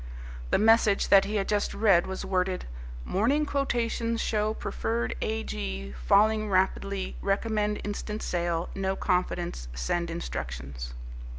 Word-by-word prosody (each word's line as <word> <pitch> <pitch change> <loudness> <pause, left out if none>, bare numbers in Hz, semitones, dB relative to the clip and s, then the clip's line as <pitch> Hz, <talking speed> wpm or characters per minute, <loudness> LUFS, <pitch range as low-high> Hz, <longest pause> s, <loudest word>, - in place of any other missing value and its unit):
The - - +3
message 220 -2 +4
that 195 -1 +7
he 210 +2 -3
had 195 -2 0
just 205 -1 0
read 200 -5 +4
was 190 0 -4
worded, 185 -1 0 0.4
"Morning 265 +10 +2
quotations 235 -5 -1
show 215 -1 0
preferred 230 +1 -2
A. 220 +1 -1
G. 65 -1 -5
falling 215 - +4
rapidly 190 0 0
recommend 210 +1 0
instant 210 +1 -4
sale 170 -1 -1
no 195 0 -1
confidence 180 - -1
send 170 - -1
instructions." 60 - -5
195 Hz, 125 wpm, -28 LUFS, 175-220 Hz, 0.4 s, that